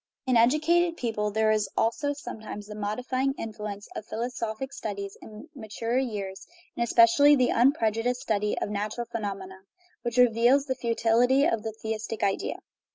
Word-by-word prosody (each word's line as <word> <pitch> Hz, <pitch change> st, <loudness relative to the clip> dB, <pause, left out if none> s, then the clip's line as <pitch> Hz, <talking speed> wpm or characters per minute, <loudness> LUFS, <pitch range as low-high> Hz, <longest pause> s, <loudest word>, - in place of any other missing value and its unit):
In 255 Hz, -2 st, +2 dB
educated 320 Hz, +8 st, +3 dB
people 215 Hz, -3 st, -1 dB
there 215 Hz, +1 st, +2 dB
is 215 Hz, -1 st, +1 dB
also 285 Hz, +6 st, +1 dB
sometimes 220 Hz, -7 st, -8 dB
the 210 Hz, -, -9 dB
modifying 250 Hz, +6 st, -2 dB
influence 210 Hz, -2 st, -6 dB
of -, -, -5 dB
philosophic 235 Hz, +3 st, -4 dB
studies 200 Hz, -4 st, -5 dB
in 215 Hz, +7 st, -11 dB
maturer 230 Hz, -1 st, -2 dB
years, 205 Hz, -7 st, -4 dB, 0.3 s
and 235 Hz, -, 0 dB
especially 235 Hz, +5 st, +6 dB
the 255 Hz, -3 st, +2 dB
unpreju 230 Hz, -3 st, +2 dB
diced 250 Hz, 0 st, 0 dB
study 210 Hz, -1 st, -1 dB
of -, -, -2 dB
natural 210 Hz, +3 st, -3 dB
phenomena, 195 Hz, -4 st, -5 dB, 0.4 s
which 240 Hz, 0 st, -3 dB
reveals 245 Hz, +3 st, +4 dB
the 265 Hz, -, -1 dB
futility 240 Hz, +3 st, +2 dB
of 225 Hz, -6 st, +1 dB
the 220 Hz, 0 st, -5 dB
theistic 220 Hz, 0 st, -3 dB
idea. 195 Hz, -1 st, -1 dB
230 Hz, 155 wpm, -27 LUFS, 210-250 Hz, 0.4 s, especially